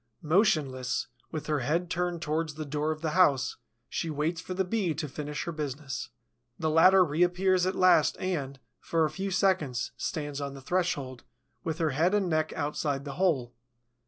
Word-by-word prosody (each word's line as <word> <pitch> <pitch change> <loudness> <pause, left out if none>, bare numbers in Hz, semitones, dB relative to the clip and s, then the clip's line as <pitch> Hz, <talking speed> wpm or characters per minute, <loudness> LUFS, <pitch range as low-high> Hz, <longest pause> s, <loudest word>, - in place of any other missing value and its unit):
Motionless, 150 - +2 0.3
with 155 -2 -4
her 150 -2 0
head 165 +7 -1
turned 175 -1 -1
towards 155 0 -1
the 155 0 -5
door 150 +2 -1
of 155 0 -5
the 160 -2 -1
house, 150 -7 +3 0.3
she 165 +5 -3
waits 155 +3 -1
for 185 - -6
the 190 - +1
Bee 180 -5 0
to 155 0 -3
finish 150 +2 -5
her 170 - -4
business. 145 -4 -4 0.5
The 160 - 0
latter 185 +4 +7
reappears 180 +3 +2
at 185 - -1
last 180 -5 +4
and, 140 -8 -3 0.2
for 165 -1 +1
a 155 - -2
few 190 +5 -3
seconds, 180 -10 +1
stands 145 -3 -3
on 140 -1 -4
the - - -8
threshold, 140 -6 -1 0.4
with 160 -1 -2
her 160 -3 +1
head 170 +9 +2
and 200 -3 +1
neck 155 -2 +1
outside 145 -1 -2
the 140 - -5
hole. 135 -10 +1
155 Hz, 180 wpm, -29 LUFS, 145-180 Hz, 0.5 s, latter